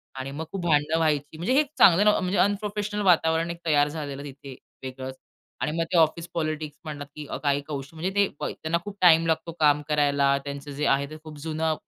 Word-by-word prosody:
आणि 135 +1 -5
मग 160 +3 -5
खूप 195 - -4
भांडण 155 0 +2
व्हायची. 155 -1 0
म्हणजे 180 +10 0
हे 290 - +5 0.2
चांगलं 190 +3 +7
न 210 - +7
म्हणजे 185 +2 -1
अनप्रोफेशनल 205 +1 0
वातावरण 165 -1 +3
तयार 145 -2 +3
झालेलं 145 -2 -6
तिथे 140 -1 -10 0.3
वेगळंच. 130 0 -6 0.5
आणि - - 0
मग 165 - +2
ते - - +4
ऑफिस 165 +1 +2
पॉलिटिक्स 155 -2 -3
म्हणतात 145 -2 -6
की 150 - -7
अ, - - -3
काही 145 0 +1
कौशल 140 +1 -6
म्हणजे 180 +4 -2
ते 205 - +4 0.2
अ, - - -1
त्यांना 160 +2 -2
खूप 205 -1 -7
टाईम 165 -2 +6
लागतो 160 +1 -1
काम 150 -1 +4
करायला, 140 -2 +3
त्यांचं 140 +1 -6
जे 145 +2 -2
आहे 140 +1 +1
ते 155 - -8
खूप 155 -2 -10
जुन्या 160 0 -1
155 Hz, 205 wpm, -25 LUFS, 145-170 Hz, 0.5 s, चांगलं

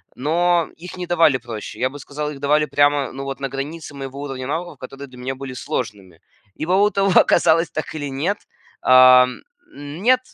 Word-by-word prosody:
но 170 +5 +1
их 180 +2 -9
не 180 -1 -5
давали 165 -6 +4
проще. 115 -3 -8
Я 130 +1 +1
бы 145 - -10
сказал, 150 +2 -5
их 140 - -9
давали 150 +2 +2
прямо, 145 -2 +2
ну 135 +1 -6
вот, 135 0 -5
на 135 -1 -3
границе 145 +2 -6
моего 135 0 -7
уровня 135 -3 -5
навыков, 165 0 -4
которые 135 +2 -9
для 125 -1 -15
меня 130 +2 -4
были 130 -1 -7
сложными. 105 - -5 0.3
И 155 - -4
по 195 +3 +4
итогу 195 -2 +1
оказалось 165 +1 +3
так 155 0 -5
или 145 -2 -4
нет? 155 +10 -1 0.5
А, 130 0 +8
м, 125 - -8 0.6
нет. 255 +1 +5
140 Hz, 190 wpm, -21 LUFS, 130-165 Hz, 0.6 s, А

